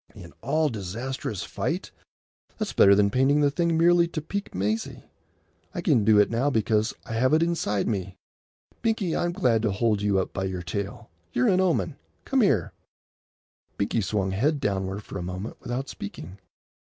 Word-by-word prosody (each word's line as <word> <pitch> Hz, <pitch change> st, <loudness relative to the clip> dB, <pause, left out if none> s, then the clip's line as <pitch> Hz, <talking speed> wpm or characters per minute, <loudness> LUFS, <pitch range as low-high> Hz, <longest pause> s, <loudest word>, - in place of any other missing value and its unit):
"In 85 Hz, -2 st, -11 dB
all 150 Hz, +5 st, +1 dB
disastrous 110 Hz, +1 st, -4 dB
fight"? -, -, -3 dB, 0.7 s
That's -, -, -3 dB
better 100 Hz, 0 st, +7 dB
than 100 Hz, 0 st, +3 dB
painting 135 Hz, +5 st, +3 dB
the 145 Hz, -1 st, +3 dB
thing 170 Hz, +2 st, +1 dB
merely 170 Hz, +1 st, +5 dB
to 165 Hz, -, -4 dB
pique 200 Hz, +6 st, -5 dB
Maisie. 105 Hz, +4 st, -2 dB, 0.7 s
I -, -, -2 dB
can 110 Hz, -, +3 dB
do 105 Hz, 0 st, +5 dB
it 105 Hz, -, +4 dB
now 120 Hz, +5 st, +1 dB
because 110 Hz, -3 st, +1 dB
I -, -, -6 dB
have 130 Hz, +6 st, +3 dB
it 160 Hz, -, +3 dB
inside 165 Hz, -, 0 dB
me. 95 Hz, -4 st, -3 dB, 0.6 s
Binkie, 220 Hz, -7 st, 0 dB
I'm 175 Hz, -, 0 dB
going 125 Hz, -, +2 dB
to 110 Hz, -2 st, +1 dB
hold 105 Hz, 0 st, +1 dB
you 100 Hz, -1 st, +2 dB
up 95 Hz, -, -1 dB
by 95 Hz, -, -2 dB
your 90 Hz, -2 st, -4 dB
tail. 100 Hz, +3 st, -5 dB, 0.2 s
You're 125 Hz, +1 st, +3 dB
an 185 Hz, 0 st, +3 dB
omen. 165 Hz, -5 st, 0 dB, 0.3 s
Come 270 Hz, -1 st, +2 dB
here." 125 Hz, -, +2 dB, 1.0 s
Binkie 100 Hz, +3 st, 0 dB
swung 95 Hz, -1 st, -1 dB
head 140 Hz, +10 st, +1 dB
downward 95 Hz, -2 st, -2 dB
for 95 Hz, -, -7 dB
a -, -, -4 dB
moment 90 Hz, +4 st, -5 dB
without 125 Hz, +3 st, -3 dB
speaking. 95 Hz, -3 st, -8 dB
115 Hz, 175 wpm, -26 LUFS, 100-150 Hz, 1.0 s, better